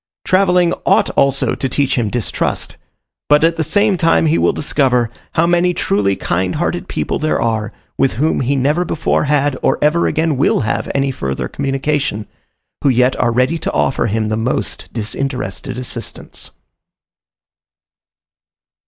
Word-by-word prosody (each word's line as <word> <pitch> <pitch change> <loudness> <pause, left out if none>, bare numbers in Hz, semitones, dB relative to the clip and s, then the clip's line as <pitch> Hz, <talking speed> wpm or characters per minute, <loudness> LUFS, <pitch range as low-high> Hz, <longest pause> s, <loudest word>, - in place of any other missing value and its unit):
Travelling 180 -2 +3
ought - - +3
also 140 0 +2
to 135 - -2
teach 140 +1 0
him 115 -4 0
distrust; 120 0 -2 0.5
but 150 +1 +5
at 165 0 +3
the 160 - -1
same 205 +5 +2
time 165 -1 +3
he 160 +1 +2
will - - +3
discover, 125 -5 +1 0.2
how 165 - +3
many 175 +1 +2
truly 100 -1 +1
kind 90 0 -1
hearted 175 +3 -2
people - - -2
there 155 0 0
are, 110 -2 -1 0.3
with 135 - +2
whom 150 +8 0
he 135 +2 0
never 145 +6 +1
before 165 -3 0
had, 145 -1 +1
or - - +2
ever 155 +3 +2
again 160 -3 0
will 140 - +2
have 110 - -2
any 135 0 +1
further 65 - -3
communication, 135 -5 -2 0.6
who 140 - +4
yet 125 0 +3
are 120 - +2
ready 130 +8 +1
to - - -2
offer 135 - +1
him 110 0 -1
the 110 - -1
most 115 +3 -2
disinterested 125 +1 -4
assistance. 120 -3 -7
135 Hz, 155 wpm, -17 LUFS, 120-160 Hz, 0.6 s, but